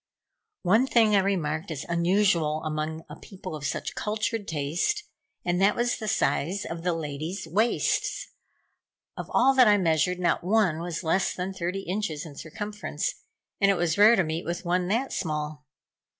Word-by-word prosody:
One 220 +9 +4
thing 225 -4 +4
I - - +6
remarked 175 -4 -1
as 150 -4 -4
unusual 170 -3 +2
among 155 +1 -3
a 150 - -9
people 185 -4 -8
of 145 -2 -4
such - - -3
cultured 215 0 -2
taste, 160 - -1 0.4
and 175 +1 +1
that 200 +2 +4
was 240 0 0
the 215 - -5
size 190 -1 0
of 165 0 -5
the 175 0 0
ladies' 160 +4 -4
waists. 230 - 0 0.8
Of - - -7
all 265 +2 +4
that 255 -3 +6
I 205 -1 +6
measured 170 -1 +2
not 180 -1 0
one 190 -4 +2
was 170 +1 -4
less 175 +4 +1
than 185 +1 -3
thirty 185 +1 -3
inches 175 -5 -3
in 150 -3 -10
circumference, 205 - -4 0.5
and 200 - +4
it 195 - +3
was 170 -2 +1
rare 210 +3 +7
to 190 - +3
meet 160 +1 -3
with 175 +2 -4
one 180 +1 +1
that 235 +7 0
small. 150 -3 -3
180 Hz, 170 wpm, -27 LUFS, 160-205 Hz, 0.8 s, rare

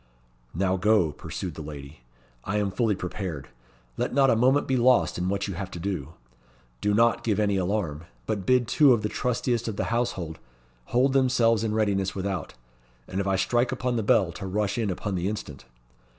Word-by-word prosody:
"Now 95 +1 +1
go," 100 -4 +3
pursued 90 +3 -6
the 80 - -8
lady; 75 -1 -9 0.4
"I 100 +2 -2
am 100 -2 0
fully 110 0 +1
prepared. 90 -5 -5 0.5
Let - - -2
not 135 -2 +5
a - - +4
moment 130 +5 +3
be 130 - +1
lost 125 -5 +3
in 90 +1 -1
what 100 +1 -1
you 100 - -4
have 95 +1 -5
to 90 - -8
do. 85 -5 -4 0.7
Do 105 0 +1
not 115 +1 +3
give 110 -3 0
any 100 -1 +2
alarm. 90 -5 -2 0.2
But 105 -3 -2
bid 125 +3 +3
two 140 +2 +5
of 110 -3 0
the 105 - 0
trustiest 120 -1 -1
of 110 - -3
the - - -1
household 90 -10 -2 0.5
hold 130 - +2
themselves 120 -4 +3
in 110 -1 -1
readiness 100 -3 0
without, 95 -2 -3 0.5
and 95 - -2
if 100 - -3
I 95 - +2
strike 120 +6 +1
upon 125 -1 -1
the 115 - +1
bell 100 -4 +3
to 95 +3 -7
rush 100 +1 -1
in 110 -3 0
upon 95 +2 -3
the 90 +1 -1
instant. 75 -10 -7
100 Hz, 195 wpm, -26 LUFS, 95-115 Hz, 0.7 s, not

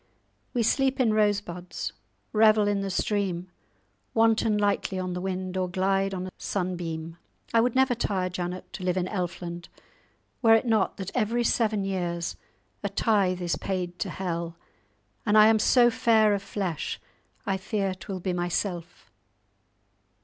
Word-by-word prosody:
We 240 - +2
sleep 270 +3 +2
in 230 -4 +3
rose 205 -2 +3
buds, 180 -2 -6 0.4
revel 215 -1 +5
in 205 -1 +1
the 195 - -2
stream, 185 -2 -1 0.6
wanton 225 -1 +3
lightly 205 -2 0
on 185 -1 -2
the 180 - -4
wind, 185 0 -3
or 185 -1 0
glide 195 +1 +1
on 185 0 -4
a 185 - -7
sunbeam. 170 -3 -3 0.4
I 230 - +5
would 245 +1 +1
never 260 -1 +4
tire, 195 -5 -1
Janet, 180 0 -5
to 190 - -6
dwell 180 0 0
in 180 - +1
Elfland, 175 -3 -4 0.7
were 225 -2 +7
it 225 - +2
not 225 -3 +1
that 190 -1 -5
every 240 0 +1
seven 220 -3 +1
years 175 -3 -2 0.5
a 200 - -2
tithe 195 -3 +1
is 175 - 0
paid 180 -2 -3
to - - -2
hell, 170 -2 -4 0.7
and 210 -1 +3
I 215 - +9
am 220 0 +5
so 240 +2 +5
fair 220 -2 +4
of 200 - -1
flesh, 190 -5 -3 0.5
I 195 -3 0
fear 195 0 -1
'twill 185 0 -7
be 185 0 -1
myself. 175 0 -3
195 Hz, 155 wpm, -27 LUFS, 180-215 Hz, 0.7 s, I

